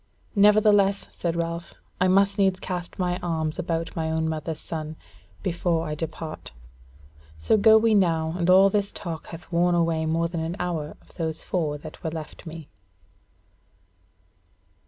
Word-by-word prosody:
"Nevertheless," 205 -1 +5
said 170 -1 -2
Ralph, 170 0 -4 0.2
"I 185 - +3
must 195 +2 +3
needs 190 -1 +3
cast 180 -2 -5
my 180 -1 -1
arms 160 -3 -2
about 165 0 -2
my 160 -2 -1
own 160 0 0
mother's 160 0 -3
son 155 -1 -5 0.5
before 170 -2 0
I 155 - -3
depart: 160 - -6 0.8
so 80 - +3
go 220 +1 +7
we 225 0 +3
now, 165 -5 +2
as 170 +1 +1
all 190 +2 +7
this 200 -1 0
talk 170 -5 -6
hath 165 0 -10
worn 175 +1 +3
away 165 -2 +1
more 165 +1 +1
than 170 -1 -4
an 165 +2 -3
hour 165 -4 -3
of - - -22
those 160 -1 -3
four 155 -5 -1
that 155 +1 -11
were 160 - -1
left 160 0 -8
me." 160 -2 -8
170 Hz, 155 wpm, -25 LUFS, 160-185 Hz, 0.8 s, go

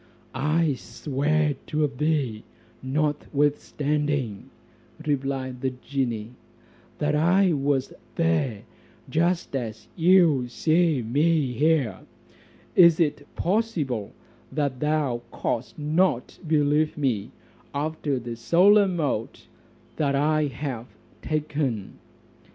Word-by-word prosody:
"I 150 +3 +1
swear 145 +5 -1
to 150 0 +1
thee, 140 -5 -1 0.4
notwithstanding," 145 -3 -1 0.6
replied 135 -3 -2
the 135 - +1
genie, 125 -3 -3 0.7
"that 150 -1 0
I 175 +4 +4
was 140 -2 0 0.2
there 90 +7 0 0.5
just 170 -1 0
as 110 -4 -5
you 165 -7 +4
see 155 +2 +2
me 145 +3 +1
here: 140 -7 +1 0.8
Is 170 -2 +7
it 145 -3 0
possible, 165 - -1 0.4
that 140 -4 -1
thou 150 -5 0
cost 120 +2 -3
not 150 -3 0
believe 150 0 +2
me 125 -9 -1 0.4
after 145 -1 -2
the 120 -1 -5
solemn 180 - +4
oath 130 -7 -2 0.5
I 150 +1 +2
have 125 -5 -5 0.3
taken?" 145 -8 -2
145 Hz, 90 wpm, -25 LUFS, 130-155 Hz, 0.8 s, Is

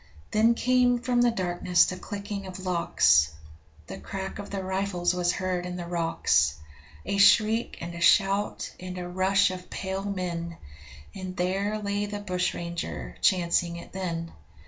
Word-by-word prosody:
Then 225 +2 +4
came 250 0 +3
from 240 0 +1
the 240 - +5
darkness 180 -4 +2
the 185 - -3
clicking 200 +1 -6
of 185 0 -8
locks; 80 - +3 0.5
The - - -8
crack 195 +1 -6
of 205 - -7
the 195 -1 -4
rifles 190 -2 0
was 175 -1 +1
heard 185 -2 -2
in 180 0 -5
the 175 -1 -5
rocks! 165 - +1 0.5
A 200 - -1
shriek 215 +3 +4
and 170 0 -5
a 170 - -7
shout, 195 +2 +3
and 185 0 -7
a 180 -1 -5
rush 190 +2 +2
of 180 -1 -8
pale 190 0 -4
men 175 -4 -4 0.6
And 185 -1 -7
there 195 +4 0
lay 205 0 -2
the 205 0 -4
bushranger, 180 -3 -3
chancing 175 -3 +2
it 170 - -10
then. 170 -3 -4
185 Hz, 155 wpm, -27 LUFS, 175-200 Hz, 0.6 s, the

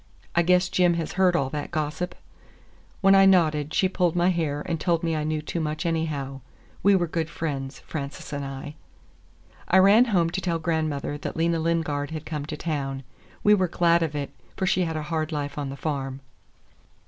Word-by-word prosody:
I 170 - +5
guess 180 +1 +3
Jim 175 -1 +3
has 165 -2 -3
heard 185 -2 +3
all 135 -5 0
that 145 -1 -4
gossip?" 155 +3 -3 0.9
When 195 0 +6
I 195 0 +7
nodded, 155 -5 +3
she 190 - +3
pulled 180 -3 0
my 175 +1 +3
hair 155 -5 -1
and 165 -2 -2
told 170 0 +1
me 165 -1 0
I 155 - -1
knew 155 0 -2
too 170 - -3
much, 155 +1 -3
anyhow. 150 -5 -2 0.4
We 200 0 +5
were 175 -2 +2
good 165 -1 -2
friends, 140 -3 -4
Frances 140 -1 -6
and 140 0 -3
I. 135 +2 -6 0.9
I 185 - +4
ran 200 +6 +7
home 175 -8 +1
to 190 +2 -2
tell 170 -3 0
grandmother 155 -3 -2
that - - -5
Lena 165 0 +1
Lingard 160 -3 -1
had 160 -1 -6
come 150 -2 -4
to 150 - -5
town. 135 -4 -3 0.4
We 210 - +6
were 190 -3 +3
glad 170 0 +3
of 155 -2 -1
it, 145 -1 -3 0.3
for 190 - 0
she 185 -1 +2
had 160 -1 -3
a 155 - -3
hard 155 0 -2
life 145 -2 -3
on 140 -2 -3
the 135 - -7
farm. 135 -3 -3
160 Hz, 200 wpm, -25 LUFS, 145-175 Hz, 0.9 s, I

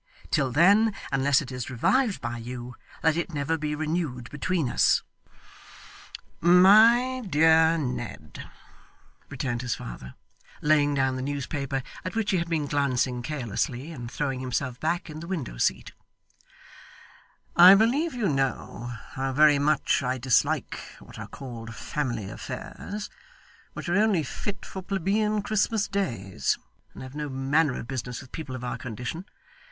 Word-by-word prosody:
Till 135 - +2
then, 200 - +5 0.2
unless 140 +1 +3
it 135 - -9
is 125 -2 -5
revived 215 - +1
by 120 0 -4
you, 120 +1 -7 0.3
let 160 -1 +4
it 170 -1 -3
never 145 +3 0
be 150 -1 -2
renewed 150 -6 -3
between 160 0 -1
us.' - - +3 1.4
'My 220 +9 +6
dear 160 +1 +5
Ned,' 125 -5 -5 0.8
returned 120 -2 -3
his 125 -2 -2
father, - - -9 0.4
laying 145 -1 +3
down 130 -1 +1
the - - -3
newspaper 140 -1 -3 0.2
at 185 - -5
which 225 -2 0
he 190 - +2
had 170 0 -2
been 160 -3 0
glancing 130 -3 0
carelessly, 130 +1 -3
and 120 -7 -7
throwing 135 0 -2
himself 125 0 -3
back 170 +3 -1
in 155 -1 -8
the 170 - -8
window 145 - -4
seat, 65 -1 0 1.6
'I 180 +3 +10
believe 260 +9 +2
you 230 -5 0
know 135 -4 -2 0.2
how 135 0 -2
very 145 +1 +5
much 150 +1 +2
I 130 0 -1
dislike 130 -1 +1 0.2
what - - -13
are - - -6
called 115 -4 -8
family 120 -9 -3
affairs, 210 - -7 0.6
which - - -7
are 175 +2 +2
only 210 -6 +3
fit 200 +8 -5
for 190 - -7
plebeian 200 +3 0
Christmas 215 0 +1
days, 110 - -1 0.4
and - - -8
have 130 0 -9
no 150 0 -4
manner 135 +2 +1
of - - -7
business 125 -2 -4
with 130 - -13
people 150 -6 -6
of 125 - -7
our 120 -1 -4
condition. 125 - -5
145 Hz, 145 wpm, -26 LUFS, 125-175 Hz, 1.6 s, I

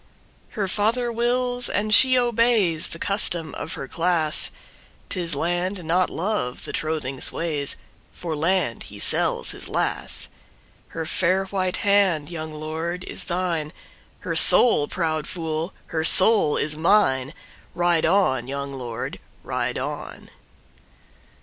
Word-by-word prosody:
Her 200 -2 -1
father 230 +5 -1
wills 245 +1 -1
and 215 +1 -1
she 255 +2 +6
obeys, 230 -8 +1
The - - -7
custom 175 -5 +1
of - - -6
her 135 - -7
class;'Tis 170 +1 -3
Land 175 +4 -3
not 175 +3 +1
Love 170 - -3
the - - -7
trothing 150 -4 -4
sways—For 150 0 -3
Land 165 - -1
he - - -11
sells - - 0
his - - -5
lass. - - -2 0.6
Her 165 -1 -6
fair 185 +4 0
white 185 -1 -2
hand, 190 -7 +1
young 160 -2 -6
lord, 160 +3 -5
is - - -5
thine, 170 -4 -3 0.5
Her - - -4
soul, 190 -12 +9
proud 155 -3 -3
fool, 165 0 -4 0.2
her 160 -1 -1
soul 190 -2 +6
is 150 +1 -3
mine, 155 -6 +1 0.4
Ride 175 -1 +1
on, 160 -9 +1
young 140 0 -6
lord, 120 -4 -6 0.2
ride - - -3
on! - - -7
170 Hz, 125 wpm, -22 LUFS, 155-200 Hz, 0.6 s, soul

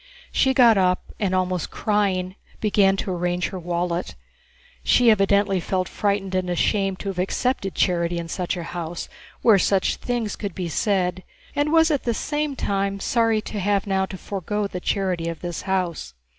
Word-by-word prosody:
She 265 -1 +2
got 235 -6 +6
up 180 -1 0
and, 190 -3 0
almost 185 -2 -1
crying, 190 -3 0 0.2
began 200 -2 +3
to 195 - -3
arrange 175 0 -1
her 185 - -6
wallet. 175 - -2 0.7
She 235 - +5
evidently 195 -1 +3
felt 185 +1 -1
frightened 200 -2 -1
and 185 -1 0
ashamed 195 +2 +1
to 200 - -3
have 185 -2 -4
accepted 195 +1 -1
charity 175 -1 +1
in 170 -1 -4 0.3
a 175 - -4
house 170 0 -5 0.4
where 215 -4 +6
such 195 0 +2
things 240 -4 -2
could 200 -5 -5
be 180 -2 -3
said, 185 0 0 0.3
and 290 +1 +1
was 325 0 +5
at 290 - +1
the 235 -2 -1
same 295 +1 -2
time 200 -3 -1
sorry 225 0 +2
to 210 - -5
have 200 0 +1
now 190 -1 0
to 190 - -7
forgo 205 +2 -3
the 185 -2 -4
charity 180 -3 -1
of 165 - -6
this 175 -2 -4
house. 175 - -2
195 Hz, 170 wpm, -23 LUFS, 180-210 Hz, 0.7 s, got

